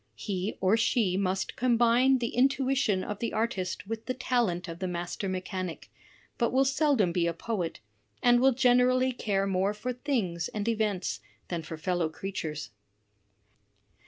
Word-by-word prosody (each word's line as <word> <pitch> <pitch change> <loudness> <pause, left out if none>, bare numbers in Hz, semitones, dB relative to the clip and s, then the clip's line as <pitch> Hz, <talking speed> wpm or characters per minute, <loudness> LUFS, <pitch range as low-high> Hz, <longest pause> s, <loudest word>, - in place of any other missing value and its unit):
He 195 -1 -3
or 190 +4 +4
she 220 -4 +2
must 190 0 -1
combine 245 +2 +4
the 235 -2 -2
intuition 265 -6 +2
of 210 -1 -5
the 230 - -2
artist 205 -5 -2
with 225 +2 -6
the 255 - -1
talent 230 -9 0
of 165 0 -7
the 185 - -2
master 175 +2 -3
mechanic, 185 -2 -5 0.5
but 235 -2 +2
will 265 +1 +3
seldom 270 - +2
be 170 0 +1
a 170 - -1
poet, 180 - -3 0.4
and 240 0 +6
will 265 +2 +5
generally 255 +1 +3
care 200 -5 -1
more 195 +1 0
for 250 +4 -3
things 205 - -1
and 210 0 -4
events 215 -5 0 0.3
than 170 -2 -2
for 160 0 -7
fellow 170 0 0
creatures.'' 160 - -5
210 Hz, 155 wpm, -29 LUFS, 185-245 Hz, 0.5 s, and